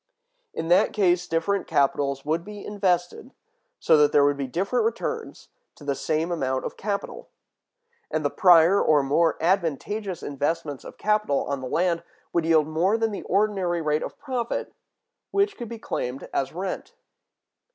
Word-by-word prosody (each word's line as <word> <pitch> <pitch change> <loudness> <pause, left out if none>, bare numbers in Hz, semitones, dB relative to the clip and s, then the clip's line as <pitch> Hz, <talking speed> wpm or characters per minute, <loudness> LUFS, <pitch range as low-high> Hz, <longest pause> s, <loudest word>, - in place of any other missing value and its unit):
In 165 - -4
that 185 +4 +4
case 180 -3 +2
different 170 +4 0
capitals 140 0 +1
would 160 +3 0
be 205 0 -9
invested, 190 +3 -1 0.4
so 160 - +4
that 150 -1 +4
there 145 - +5
would 145 0 +2
be 140 -1 -3
different 190 - 0
returns 455 0 -3 0.3
to - - -15
the 140 -1 0
same 155 +5 -1
amount 130 -6 -1
of - - -5
capital; 200 -1 -4 0.8
and - - -2
the - - +1
prior 180 +1 +6
or 150 -2 +4
more 160 +4 +2
advantageous 185 +3 -1
investments 145 0 -2
of - - -11
capital 210 -9 +1
on 140 -1 -3
the 130 - -5
land 170 +1 +1 0.3
would 170 -2 +1
yield 160 -2 +4
more 175 +7 +1
than 225 -1 0
the 200 - -5
ordinary 195 -3 +1
rate 155 -1 0
of - - -6
profit, 255 -5 -3 0.6
which 400 0 +1
could 240 -3 -7
be 235 - -6
claimed 130 - -4
as 135 -1 -1
rent. 185 +3 -5
170 Hz, 160 wpm, -25 LUFS, 150-200 Hz, 0.8 s, prior